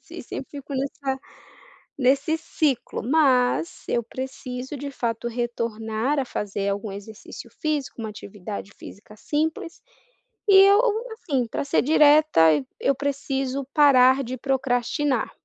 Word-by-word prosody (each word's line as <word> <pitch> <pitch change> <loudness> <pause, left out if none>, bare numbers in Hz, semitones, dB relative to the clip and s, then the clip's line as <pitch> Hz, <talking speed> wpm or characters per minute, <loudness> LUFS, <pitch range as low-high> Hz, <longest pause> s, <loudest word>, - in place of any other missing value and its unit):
assim, - - -10
sempre - - -7
fico 280 -1 -7
nessa 270 0 -3 0.8
nesse 280 +4 +2
ciclo, 290 -5 -1
mas 250 - +2
eu 235 - 0
preciso, 260 +2 -6
de 280 +1 -6
fato, 235 -2 -3
retornar 235 +2 -2
a 265 - -1
fazer 200 -3 -3
algum 200 +1 -3
exercício 205 +2 -10
físico, 305 -4 -2
uma 220 -1 -4
atividade 200 -1 -8
física 210 +1 -12
simples, 320 - -3 0.7
e 400 - +6
eu, 400 +2 +6 0.3
assim, 275 - -2
para 225 - -3
ser 280 - +2
direta, 295 - +5
e 145 -3 -2 0.2
eu 275 - +3
preciso 275 -1 -2
parar 270 -2 +5
de 255 +2 -5
procrastinar, 260 0 0
260 Hz, 130 wpm, -24 LUFS, 230-285 Hz, 0.8 s, e